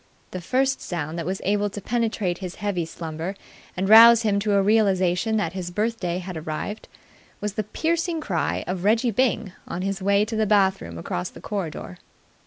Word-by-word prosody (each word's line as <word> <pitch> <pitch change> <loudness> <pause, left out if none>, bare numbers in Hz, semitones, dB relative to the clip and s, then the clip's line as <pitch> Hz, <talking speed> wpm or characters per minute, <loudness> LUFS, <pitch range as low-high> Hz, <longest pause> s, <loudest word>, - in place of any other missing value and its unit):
The 185 - -5
first 265 +8 0
sound 165 -1 -4
that 165 - -4
was 190 +1 -3
able 205 +1 +1
to 205 - -7
penetrate 215 -5 -1
his 185 -2 -6
heavy 190 -5 -2
slumber 165 +3 -6 0.4
and 190 +1 0
rouse 230 +2 +9
him 205 -2 +2
to 205 0 0
a 200 - +4
realization 200 0 +2
that 170 -5 -1
his 185 -2 -4
birthday 200 -2 -2
had 185 0 -6
arrived 160 +7 -5 0.5
was 210 -1 -3
the 215 0 -2
piercing 330 - -1
cry 180 - -1
of 180 0 -4
Reggie 225 +4 +3
Byng 225 -4 0
on 180 - -4
his 195 0 -2
way 200 +2 +3
to 225 +1 -5
the 220 -1 +1
bath 195 -2 +3
room 85 0 -8
across 90 +1 -4
the - - -13
corridor. 165 - -5
200 Hz, 190 wpm, -24 LUFS, 175-220 Hz, 0.5 s, rouse